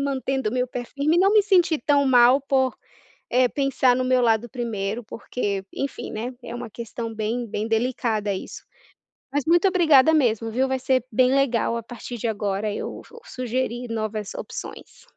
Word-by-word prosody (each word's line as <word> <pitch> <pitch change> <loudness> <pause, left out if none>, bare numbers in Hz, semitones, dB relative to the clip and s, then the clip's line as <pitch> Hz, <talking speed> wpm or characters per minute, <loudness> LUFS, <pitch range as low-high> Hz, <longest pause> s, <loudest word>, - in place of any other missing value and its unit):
mantendo 265 -3 -1
o - - -7
meu 250 0 0
pé 245 -1 -5
firme 285 +6 0
e - - +4
não 390 +2 +4
me 425 -1 +6
sentir 355 -6 +3
tão 285 -2 +3
mal 250 +1 +6
por, 265 -2 0 0.5
eh, 250 0 +4
pensar 265 -2 +2
no 255 - 0
meu 255 0 +2
lado 230 0 +2
1º 225 -2 -3
porque, 205 -3 -4
enfim, 275 - -4
né, 235 +4 -4
é - - -7
uma 240 -1 -6
questão 230 +1 -6
bem 225 +3 -2
bem 215 +1 -3
delicada 225 -3 0
isso. 190 - -7 0.7
Mas 285 -1 +1
muito 345 +3 +4
obrigada 320 -5 +5
mesmo 225 -6 +1
viu, 260 +3 +1
vai 265 - 0
ser 260 -1 +1
bem 255 +3 +3
legal, 245 -4 +1
a 230 - -5
partir 240 +1 -8
de 230 - -3
agora 205 -1 -2
eu - - -5
vou 470 - -14
sugerir 250 0 -3
novas 215 -2 -3
opções. - - -8
245 Hz, 180 wpm, -23 LUFS, 225-270 Hz, 0.7 s, me